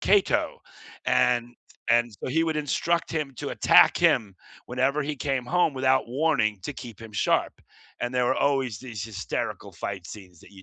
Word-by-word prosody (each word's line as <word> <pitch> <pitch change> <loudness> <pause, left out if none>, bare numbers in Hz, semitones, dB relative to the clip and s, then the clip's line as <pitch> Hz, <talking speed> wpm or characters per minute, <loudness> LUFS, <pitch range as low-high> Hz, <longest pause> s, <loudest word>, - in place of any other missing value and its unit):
Cato, 200 -1 +2 0.5
and 120 0 +2 0.4
and 120 0 +3
so - - -3
he 160 +5 +2
would 160 -1 -1
instruct 165 +3 0
him 150 -4 -3
to - - -4
attack - - +5
him 100 -3 +2 0.3
whenever 130 +4 0
he 150 +1 -3
came 135 -2 -2
home 170 +2 +1
without 130 -1 +2
warning 125 -6 +1
to 145 - -4
keep 120 -6 -10
him 115 -1 -10
sharp, 100 - +1 0.5
and 120 +1 -3
there 125 -1 +2
were 125 +2 +2
always 135 -6 0
these 120 -6 -7
hysterical 105 -3 -4
fight 95 -3 -6
scenes 90 -4 -12
that 100 - -17
you 95 -1 -14
125 Hz, 175 wpm, -26 LUFS, 110-145 Hz, 0.5 s, attack